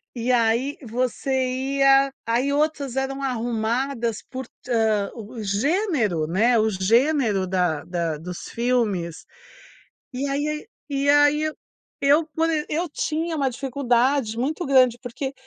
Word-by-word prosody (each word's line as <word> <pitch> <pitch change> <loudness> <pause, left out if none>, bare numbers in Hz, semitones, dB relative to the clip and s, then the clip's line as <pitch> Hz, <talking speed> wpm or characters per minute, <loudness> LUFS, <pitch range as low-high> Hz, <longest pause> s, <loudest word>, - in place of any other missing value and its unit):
E 245 +1 -1
aí 240 +4 +2
você 250 +3 -2 0.5
ia 275 0 +5
aí 240 +5 +1
outras 290 -3 0
eram 270 +1 -2
arrumadas 235 -1 -1
por, 260 0 -5 0.2
hã, 220 -4 +1
o 225 0 -8
gênero, 220 - 0
né, 225 +8 +3
o 220 0 +2
gênero 220 0 +2
da 180 -5 0
da 170 -3 -2
dos 175 +3 -7
filmes, 215 -9 -1 0.9
e 265 +3 -2
aí 300 +2 -2 0.2
e 280 0 0
aí 290 +1 +5
eu 310 0 -2 0.5
eu 290 +3 +4
quan 325 0 +2 0.2
eu 335 +4 -1
tinha 320 +3 -2
uma 275 -3 +1
dificuldade 255 -2 0
muito 300 +8 -2
grande 255 -3 +4
porque 265 +2 -5
250 Hz, 130 wpm, -23 LUFS, 220-280 Hz, 0.9 s, ia